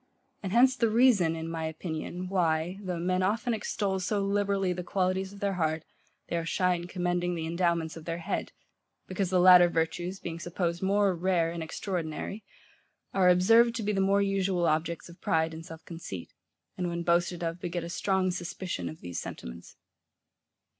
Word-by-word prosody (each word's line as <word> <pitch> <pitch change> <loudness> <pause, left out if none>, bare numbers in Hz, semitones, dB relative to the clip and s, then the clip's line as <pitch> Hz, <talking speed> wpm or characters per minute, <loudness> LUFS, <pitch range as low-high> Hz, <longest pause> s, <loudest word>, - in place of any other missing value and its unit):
And 190 - -4
hence 250 +4 +5
the 230 -3 +2
reason, 215 -8 +4
in 160 0 -5
my 165 -1 -3
opinion, 160 +3 -5
why, 175 -1 0
though 185 -3 -3
men 185 +2 0
often 225 +6 +1
extol 200 -2 -1
so 200 +3 0
liberally 200 -2 +1
the 180 - -4
qualities 190 +1 0
of 200 - -13
their 200 -1 0
heart, 160 0 0 0.4
they 170 - -1
are 165 - -1
shy 180 +2 +1
in 175 0 -4
commending 175 -1 -1
the 160 -1 -3
endowments 170 -1 0
of 160 -1 -10
their 165 0 -3
head: 170 - -3 0.5
because 185 0 -2
the 185 -1 +3
latter 180 -1 +8
virtues, 170 +3 -2
being 165 -1 -6
supposed 170 0 -2
more 200 0 +3
rare 170 -1 +1
and 170 -1 -5
extraordinary, 175 +4 -4 0.7
are 185 -2 +4
observed 225 +7 +5
to 230 - -2
be 210 - 0
the 195 - +1
more 200 +1 +3
usual 195 -3 +1
objects 165 +1 0
of 170 0 -15
pride 160 0 +1
and 165 +1 -9
self 160 -1 -11
conceit; 165 - -8 0.5
and 180 - 0
when 170 0 -3
boasted 175 0 +1
of, 165 +1 -3
beget 175 -1 -3
a - - -5
strong 190 +1 +1
suspicion 175 - -4
of 80 - -10
these 90 -1 -5
sentiments. - - -9
180 Hz, 180 wpm, -29 LUFS, 165-195 Hz, 0.7 s, latter